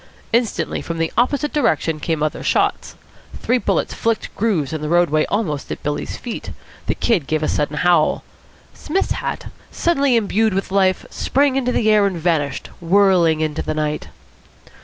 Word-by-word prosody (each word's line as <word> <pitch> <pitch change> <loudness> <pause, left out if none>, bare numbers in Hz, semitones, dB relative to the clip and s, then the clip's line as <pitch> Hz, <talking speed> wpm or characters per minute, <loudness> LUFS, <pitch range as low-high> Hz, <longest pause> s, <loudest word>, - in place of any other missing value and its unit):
Instantly 235 -1 0
from 165 - -5
the 165 0 -1
opposite 285 +5 +1
direction 160 - +1
came 155 0 -1
other 155 - -2
shots. - - 0 0.4
Three 250 +1 +1
bullets - - 0
flicked 230 -1 -2
grooves 185 -10 0
in 155 - -3
the 150 - -3
roadway 170 -3 +3
almost 165 -10 -2
at - - -6
Billy's 145 0 -3
feet. 240 - -6 0.4
The - - 0
Kid 190 - +1
gave 155 0 0
a - - +1
sudden 150 0 -1
howl. 175 -3 +2 0.5
Psmith's 380 +6 -2
hat, - - -3 0.2
suddenly 280 -7 +1
imbued 220 -1 +1
with 195 0 -2
life, 190 -1 +2
sprang 275 0 +1
into 255 -2 0
the 220 -3 +2
air 210 -1 +4
and 190 -3 -3
vanished, 160 -4 -1
whirling 175 -3 +3
into 155 0 -1
the 155 - -3
night. 150 0 -2
180 Hz, 165 wpm, -20 LUFS, 155-230 Hz, 0.5 s, air